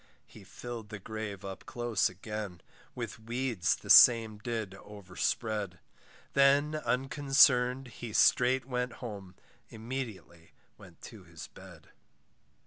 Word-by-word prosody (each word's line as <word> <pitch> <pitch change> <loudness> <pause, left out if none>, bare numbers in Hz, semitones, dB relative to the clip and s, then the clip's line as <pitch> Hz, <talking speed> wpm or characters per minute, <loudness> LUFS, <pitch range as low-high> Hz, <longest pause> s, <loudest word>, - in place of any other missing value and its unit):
He 105 - -15
fill'd 115 +2 -9
the 105 - -7
grave 105 -1 -7
up 95 -1 -8
close 120 -4 0
again, 100 -1 -7 0.3
With 120 0 -6
weeds 115 -4 -1
the - - -14
same 115 -3 +7
did 110 -3 -4
overspread; 100 0 -4 0.6
Then 140 +2 +4
unconcerned, 135 -2 +2
he 115 0 -8
straight 125 +4 +3
went 125 -2 -3
home, 100 -6 -9 0.3
Immediately 110 -8 -8 0.2
went - - -17
to - - -11
his - - -11
bed. - - -15
115 Hz, 115 wpm, -30 LUFS, 105-125 Hz, 0.6 s, same